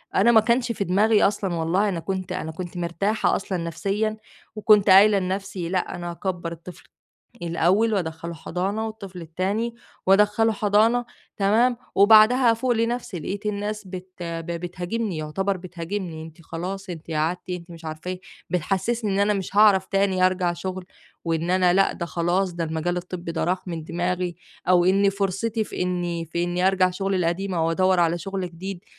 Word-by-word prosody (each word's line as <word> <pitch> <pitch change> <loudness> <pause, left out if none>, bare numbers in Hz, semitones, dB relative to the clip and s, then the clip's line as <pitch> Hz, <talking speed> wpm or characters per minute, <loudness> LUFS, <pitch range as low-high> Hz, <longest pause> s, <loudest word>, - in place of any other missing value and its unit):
أنا 220 +5 +5
ما 225 -2 +7
كانش 235 +2 +1
في 215 - -2
دماغي 205 +3 +3
أصلًا 195 -3 +1
والله، 175 +6 +1
أنا 180 -4 -2
كنت 185 +1 -4
أنا 180 -3 -3
كنت 175 +2 -7
مرتاحة 175 +5 0
أصلًا 190 -1 -3
نفسيًا 195 +6 -2 0.4
وكنت 210 -1 +4
قايلة 200 +2 +7
لنَفسي 190 -1 -3
لأ، 185 0 -1
أنا 175 0 -5
هاكبّر 175 -1 -4
الطفل 170 +1 -10 0.6
الأول 185 +6 +2
وأدخّله 170 -2 -3
حضانة 190 +7 -3
والطفل 195 -5 -8
التاني 195 +8 -2 0.3
وأدخّله 210 +3 +4
حضانة، 215 +4 +2 0.3
تمام، 225 +5 +3 0.2
وبعدها 220 +4 +6
أفوق 230 +3 -1
لنَفسي، 230 -3 -1
لقيت 200 +7 -5
الناس 210 0 -3
بت 185 0 -7
ب 165 -1 -5
بتهاجمني، 180 +3 -3
يُعتبَر 190 +6 -1
بتهاجمني، 175 -1 -5
"أنتِ 160 +1 -12
خلاص، 185 +5 -6
أنتِ 165 -1 -8
قعَدتِ." 160 +4 -1
أنت 180 -1 -6
مش 165 -1 -11
عارفة 155 +3 -5
إيه، 185 0 -5 0.3
بتحسّسني 200 +6 -1
إن 195 - 0
أنا 205 +1 +3
مش 195 0 -4
هاعرَف 205 -3 +6
تاني 195 -2 +2
أرجَع 185 -1 0
شُغل 185 +2 -5 0.4
وإن 165 +1 -1
أنا 185 -1 +4
لأ، 195 +1 +3
ده 170 - -5
خلاص، 175 +2 0
ده 170 -1 -2
المجال 160 +2 -2
الطبّي 180 -1 -5
ده 165 - -1
راح 185 +2 -1
من 165 -2 -5
دماغي 175 +1 -2 0.3
أو 180 -1 +5
إنّي 195 +2 +4
فُرصتي 200 +3 -1
في - - -4
إني 175 -2 -2
في 170 +2 -2
إني 175 +1 0
أرجَع 185 -1 +3
شُغلي 195 +1 -1
القديم 180 +2 -1
أو 165 -1 +1
أدوّر 185 +1 +3
على 170 0 +2
شُغل 190 0 -4
جديد 185 +2 -7
185 Hz, 170 wpm, -24 LUFS, 175-205 Hz, 0.6 s, ما